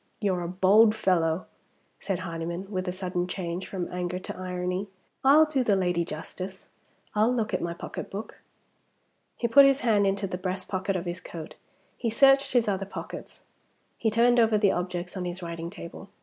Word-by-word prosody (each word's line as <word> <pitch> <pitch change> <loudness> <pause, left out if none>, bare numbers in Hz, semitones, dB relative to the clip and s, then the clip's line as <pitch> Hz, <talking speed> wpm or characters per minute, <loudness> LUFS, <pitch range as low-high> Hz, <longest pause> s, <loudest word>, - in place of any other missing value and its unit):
"You're 190 -4 0
a 170 - -3
bold 200 +5 +5
fellow," 175 -5 +1 0.5
said 190 -3 -2
Hardyman, 170 +3 -5
with 185 -1 -2
a - - 0
sudden 180 -1 -2
change 180 0 -4
from 185 -3 -4
anger 180 0 -2
to 185 - -7
irony. 180 +1 -3 0.4
"I'll 290 +4 +7
do 290 -4 0
the 210 -4 +3
lady 180 -2 +1
justice. 185 +4 -7 0.4
I'll 215 +3 +3
look 225 -4 -1
at - - 0
my 170 0 -3
pocketbook." 200 +4 -7 1.0
He 235 - 0
put 275 +5 +8
his 275 0 +2
hand 210 -4 +3
into 195 +1 0
the 180 -2 -4
breast 185 0 -3
pocket 190 0 -1
of 180 0 -2
his 175 +1 -4
coat; 160 -2 -8 0.4
he 235 - -1
searched 275 +4 +5
his 240 -3 +3
other 195 -1 -1
pockets; - - -8 0.5
he 225 - 0
turned 240 +2 +4
over 225 -2 +4
the 205 -2 +4
objects 180 0 -3
on 185 -1 -3
his 175 +1 -5
writing 170 0 -5
table. 190 +1 -10
185 Hz, 180 wpm, -27 LUFS, 180-215 Hz, 1.0 s, put